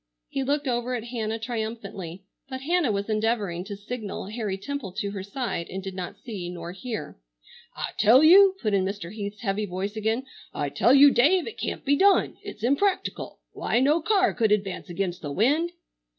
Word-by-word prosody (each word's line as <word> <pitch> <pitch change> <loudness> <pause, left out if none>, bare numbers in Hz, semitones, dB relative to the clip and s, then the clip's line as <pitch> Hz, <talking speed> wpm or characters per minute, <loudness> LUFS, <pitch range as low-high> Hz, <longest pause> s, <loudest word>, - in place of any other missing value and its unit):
He 275 - -2
looked 285 +2 0
over 245 0 -1
at 230 - -4
Hannah 225 -2 -3
triumphantly, 220 -6 -5 0.3
but 260 -1 -5
Hannah 330 -3 +1
was 200 0 -2
endeavoring 215 -5 0
to 205 0 -6
signal 205 -2 -6
Harry 210 -3 -3
Temple 245 -2 -5
to 200 +1 -3
her 200 -1 -5
side 200 -3 -4
and 190 0 -5
did 190 0 -5
not 185 -1 -6
see 195 -8 -6
nor 170 -1 -6
hear. 215 - -6 0.6
"I - - -3
tell 230 +7 +7
you," 380 +4 +8
put 215 -2 +1
in 195 -1 +3
Mr. 195 -1 -4
Heath's 205 +1 -6
heavy 210 -1 -1
voice 190 +3 -4
again, 220 +4 -1 0.3
"I 145 - -1
tell 245 - +4
you, 285 0 +8
Dave, 320 +9 +4
it 455 - -8
can't - - -4
be 285 +1 +4
done. 395 +5 +3
It's 395 - -9
impractical. 365 - 0
Why, - - 0
no 295 +6 +3
car 380 +1 +3
could 220 -3 +1
advance 195 -2 -1
against 175 0 -3
the 145 - -5
wind." 290 - +2
220 Hz, 190 wpm, -26 LUFS, 195-270 Hz, 0.6 s, you